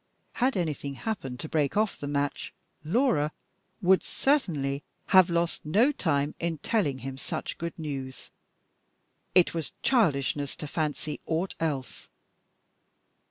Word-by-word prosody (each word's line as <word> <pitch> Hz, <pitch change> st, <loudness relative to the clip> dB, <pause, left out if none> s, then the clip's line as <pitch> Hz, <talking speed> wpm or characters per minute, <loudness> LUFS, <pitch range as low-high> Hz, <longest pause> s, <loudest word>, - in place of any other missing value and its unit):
Had 255 Hz, -2 st, +1 dB
anything 150 Hz, -5 st, -2 dB
happened 135 Hz, -, -4 dB
to -, -, -4 dB
break 150 Hz, +1 st, +1 dB
off 215 Hz, -1 st, +2 dB
the 145 Hz, -, -6 dB
match, 145 Hz, 0 st, -2 dB, 0.3 s
Laura 160 Hz, -, +2 dB, 0.5 s
would 185 Hz, +1 st, +5 dB
certainly 150 Hz, -, 0 dB, 0.3 s
have 185 Hz, -1 st, +8 dB
lost 170 Hz, 0 st, 0 dB
no 215 Hz, -, +4 dB
time 145 Hz, -, 0 dB
in 170 Hz, -1 st, -1 dB
telling 150 Hz, -, 0 dB
him 135 Hz, 0 st, -5 dB
such -, -, -4 dB
good 170 Hz, 0 st, -4 dB
news. 135 Hz, -5 st, -6 dB, 1.0 s
It 180 Hz, -2 st, +6 dB
was 165 Hz, -2 st, -4 dB
childishness 145 Hz, -, +2 dB
to 160 Hz, -, -6 dB
fancy 150 Hz, 0 st, -2 dB
aught 170 Hz, +4 st, 0 dB
else. 145 Hz, -6 st, -3 dB
160 Hz, 125 wpm, -28 LUFS, 140-185 Hz, 1.0 s, have